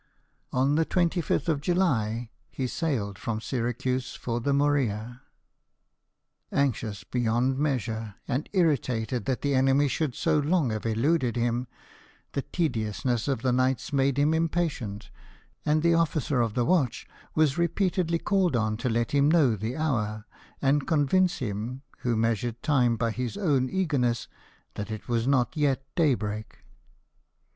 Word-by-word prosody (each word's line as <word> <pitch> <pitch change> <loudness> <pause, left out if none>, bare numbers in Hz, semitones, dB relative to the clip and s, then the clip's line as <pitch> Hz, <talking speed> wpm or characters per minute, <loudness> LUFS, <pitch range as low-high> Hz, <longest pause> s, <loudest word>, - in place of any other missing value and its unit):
On 135 +3 +2
the 160 +2 +3
25th 170 -3 0
of 155 -4 +1
July 120 - 0 0.2
he 130 - -3
sailed 120 - -2
from 110 -2 -2
Syracuse 125 +1 -2
for 120 -1 -3
the 140 +4 0
Morea. 130 -5 0 1.3
Anxious 115 -7 -1
beyond 125 +2 0
measure, 115 -7 -2
and 135 +5 -2
irritated 125 - 0
that 130 - -2
the 140 -1 +1
enemy 135 +2 +3
should 140 -2 -1
so - - +2
long 150 -3 +1
have 110 +1 -3
eluded 125 +3 +1
him, 120 +1 0 0.6
the 140 - -1
tediousness 120 - -1
of 135 -4 -1
the 130 - +2
nights 130 +2 0
made 135 -1 +2
him 145 +2 +3
impatient; 155 -11 -2 0.6
and 155 +1 +3
the 170 0 +4
officer 155 -5 +1
of 115 -3 -1
the 120 - +2
watch 150 -8 +1 0.3
was 155 0 +2
repeatedly 170 0 +1
called 185 -4 +1
on 110 -2 0
to 125 - -1
let 115 0 0
him 140 0 +4
know 150 -8 +4
the 110 +6 -4
hour, 110 -9 -1 0.4
and 140 +1 +2
convince 170 +5 +2
him, 120 +3 -4 0.2
who 120 -2 0
measured 115 +1 -1
time 125 -6 +3
by 115 0 0
his 125 - -4
own 140 -10 +1
eagerness, 135 - 0 0.5
that 105 +1 -5
it 110 -1 -6
was 120 0 0
not 130 +1 +2
yet 140 -3 +1
daybreak. 110 - -1
130 Hz, 145 wpm, -27 LUFS, 115-150 Hz, 1.3 s, the